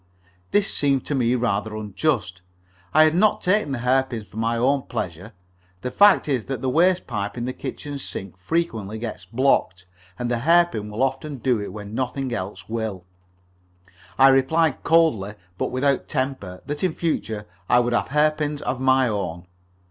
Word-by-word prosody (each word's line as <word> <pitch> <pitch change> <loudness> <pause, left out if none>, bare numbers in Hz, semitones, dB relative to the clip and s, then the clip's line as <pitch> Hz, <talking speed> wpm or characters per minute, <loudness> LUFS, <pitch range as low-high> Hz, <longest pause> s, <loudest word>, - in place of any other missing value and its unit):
This 205 -1 +1
seemed 140 -3 +1
to - - -2
me 125 -2 +2
rather 110 -3 -1
unjust. 105 - -2 0.5
I 155 - +6
had 155 0 +4
not 205 +5 +2
taken 185 -4 +2
the 135 - -1
hairpins 125 -4 +1
for 105 - -14
my 115 +1 0
own 135 +4 +2
pleasure. 95 +3 -5 0.5
The 125 - -3
fact 205 +1 +5
is 130 -6 0
that 135 -2 -4
the 130 - +1
waste 180 +5 +3
pipe 105 -4 -3
from 120 -1 -3
the 130 - -3
kitchen 140 +2 -6
sink 95 -8 -7
frequently 110 - -2
gets 110 -5 -6
blocked, 95 -5 +1 0.3
and 120 +3 -2
a 120 - 0
hairpin 165 -7 +3
will 105 +5 -1
often 135 +2 -2
do 125 -3 0
it 100 - -5
when 105 +1 -8
nothing 130 +1 -2
else 95 -2 -5
will. 110 -5 -4 1.1
I 135 0 +7
replied 135 +3 +2
coldly, 150 -12 +2 0.2
but - - 0
without 135 +1 0
temper, 130 -9 -3
that 145 +2 -4
in 180 -4 +1
future 110 -10 -2 0.2
I 125 - +6
would 120 0 0
have - - +1
hairpins 150 0 +1
of 130 - -2
my 130 0 +4
own. 90 -5 -3
125 Hz, 170 wpm, -23 LUFS, 105-145 Hz, 1.1 s, I